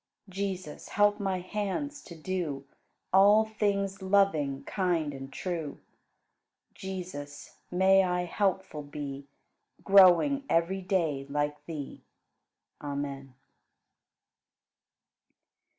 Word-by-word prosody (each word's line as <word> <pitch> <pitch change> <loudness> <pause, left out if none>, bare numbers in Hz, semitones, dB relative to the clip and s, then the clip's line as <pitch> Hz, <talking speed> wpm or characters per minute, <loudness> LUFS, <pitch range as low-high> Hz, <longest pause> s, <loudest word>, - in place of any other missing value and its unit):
Jesus, 185 -4 -5
help 205 0 +3
my 190 -2 -1
hands 210 +10 -3
to 170 - -10
do 160 -5 -3 0.5
All 205 +3 +6
things 200 -3 -1
loving, 190 -8 +2
kind, 170 -6 -1
and 135 0 -8
true. 165 -5 -4 1.0
Jesus, 175 -7 -7
may 190 +2 +5
I 180 -1 0
helpful 190 -3 -1
be, 140 -1 -7 0.6
Growing 195 - +6
every 170 +4 +1
day 165 -8 -1
like 145 0 -2
Thee. 150 -4 -7 0.8
Amen. 140 -2 -5
180 Hz, 85 wpm, -29 LUFS, 145-195 Hz, 1.0 s, All